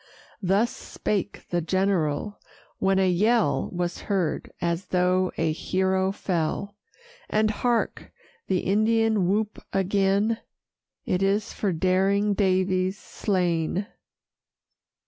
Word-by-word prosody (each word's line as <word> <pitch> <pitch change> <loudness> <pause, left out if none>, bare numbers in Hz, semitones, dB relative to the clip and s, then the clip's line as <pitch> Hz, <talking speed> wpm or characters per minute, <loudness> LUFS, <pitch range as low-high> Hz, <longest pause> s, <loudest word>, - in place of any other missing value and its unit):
Thus 200 +5 +2
spake 205 -1 -3
the 175 -1 +1
general; 185 +1 0 0.4
when 195 0 +2
a 190 -1 +3
yell 215 +6 +2
Was 175 -1 -2
heard, 185 -6 -1
as 170 +1 -1
though 180 0 +2
a 165 -1 +1
hero 190 +3 0
fell. 190 +1 -2 0.5
And, 215 0 +2
hark! 235 +2 -1 0.4
the 185 - +1
Indian 220 -1 +2
whoop 210 +1 -1
again 200 +3 +1 0.7
It 180 - 0
is 200 +3 +1
for 200 - -1
daring 190 +4 +2
Daviess 185 -1 +1
slain! 180 -2 -1
190 Hz, 105 wpm, -25 LUFS, 180-205 Hz, 0.7 s, a